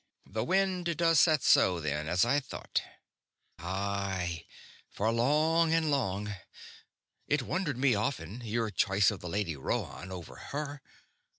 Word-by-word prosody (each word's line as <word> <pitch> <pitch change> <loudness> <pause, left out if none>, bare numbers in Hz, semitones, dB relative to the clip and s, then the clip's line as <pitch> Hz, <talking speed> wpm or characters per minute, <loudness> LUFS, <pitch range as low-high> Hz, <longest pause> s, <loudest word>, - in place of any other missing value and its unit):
The 110 +2 -3
wind 180 0 +1
does 165 -2 +4
set 155 -1 +4
so, 90 -2 +5
then, 75 -1 -2
as 90 +5 +3
I 140 +5 +3
thought." 135 - -3 0.8
"Aye. 95 -2 -3 0.4
For 110 +3 0
long 155 +7 +3
and 160 -2 +2
long. 105 -6 -1 0.9
It 145 -2 +1
wondered 160 -4 -2
me 130 -1 +3
often, 105 - -2
your 115 -1 -1
choice 95 +2 +3
of 100 - -6
the 90 - -7
Lady 95 -3 -1
Rhoann 90 +6 -3
over 90 -3 -8
her. 145 0 -5
110 Hz, 135 wpm, -30 LUFS, 95-150 Hz, 0.9 s, so